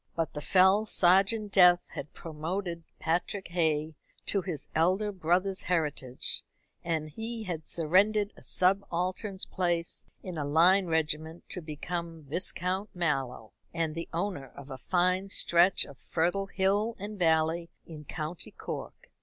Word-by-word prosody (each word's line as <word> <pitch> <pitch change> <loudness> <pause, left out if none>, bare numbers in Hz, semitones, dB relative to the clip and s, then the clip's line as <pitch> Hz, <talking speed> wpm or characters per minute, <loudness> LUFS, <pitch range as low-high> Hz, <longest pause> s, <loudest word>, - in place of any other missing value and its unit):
But 165 -1 -1
the 150 - -5
fell 190 +6 +4
sergeant 195 +4 +3
Death 180 -2 +6
had 140 - -7
promoted 170 +2 -4 0.2
Patrick 180 +4 -1
Hay 160 -2 0 0.3
to 200 - 0
his 170 -6 -5
elder 185 +6 +2
brother's 185 +1 +1
heritage, 150 -7 -1 0.4
and 160 -2 -1
he 225 +7 -6
had 170 -6 -5
surrendered 200 +6 +2
a - - -16
subaltern's 185 +1 +1
place 175 -2 -1 0.2
in 180 -4 -5
a - - -1
line 175 +6 +4
regiment 160 0 -2
to 180 - -4
become 165 +1 -5
Viscount 180 +6 -2
Mallow, 135 -9 -2 0.2
and 165 -2 0
the 165 +1 -5
owner 170 -5 -2
of 140 0 -10
a 130 - -5
fine 185 +5 +1
stretch 175 0 +4
of 140 - -13
fertile 180 +4 0
hill 200 +4 +1
and 205 +1 -7
valley 165 0 +2 0.2
in 155 -2 -10
County 155 +2 -5
Cork. - - -8
175 Hz, 135 wpm, -29 LUFS, 160-190 Hz, 0.4 s, Death